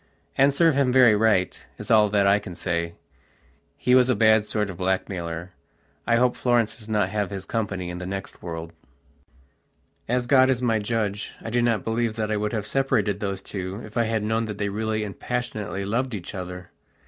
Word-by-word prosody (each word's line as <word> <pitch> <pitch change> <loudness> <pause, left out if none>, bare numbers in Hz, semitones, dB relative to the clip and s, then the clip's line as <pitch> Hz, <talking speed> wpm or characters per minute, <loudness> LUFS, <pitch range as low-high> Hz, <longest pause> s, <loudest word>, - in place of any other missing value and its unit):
And 135 +1 +5
serve 165 +3 +4
him 135 -2 +2
very 125 -4 +6
right, 105 -4 +1
is - - -5
all 105 -2 +6
that 100 -1 +2
I 100 +1 +4
can 95 -4 -9
say. 85 -1 -2 0.8
He 125 - +1
was 130 0 +5
a 125 - +3
bad 110 -1 +4
sort 105 -2 -1
of 90 - -10
blackmailer; 90 -2 -2 0.6
I 115 - +4
hope 125 +1 +3
Florence 120 -3 +1
does 110 -1 -12
not 105 -3 +1
have 105 -1 -1
his 95 -1 -6
company 95 -5 -3
in 90 - -6
the 90 - -6
next 95 0 -6
world. 80 -1 -6 1.3
As 125 +1 0
God 130 0 +5
is 130 -2 +2
my 115 -3 +1
Judge, 105 -1 -2
I 115 - -5
do 120 +1 +2
not 115 -5 +1
believe 115 0 -1
that 110 -1 -2
I 105 - +1
would 105 0 -1
have 110 -3 -2
separated 110 -5 +1
those 100 -2 -3
two 95 0 -5
if 105 - -13
I 120 -1 +2
had 110 -1 -1
known 110 +1 0
that 105 -2 -6
they 100 0 -1
really 110 +1 -2
and 100 -2 -7
passionately 105 -5 -3
loved 120 +4 -1
each 90 -4 -7
other. 90 -1 -7
105 Hz, 205 wpm, -24 LUFS, 95-115 Hz, 1.3 s, very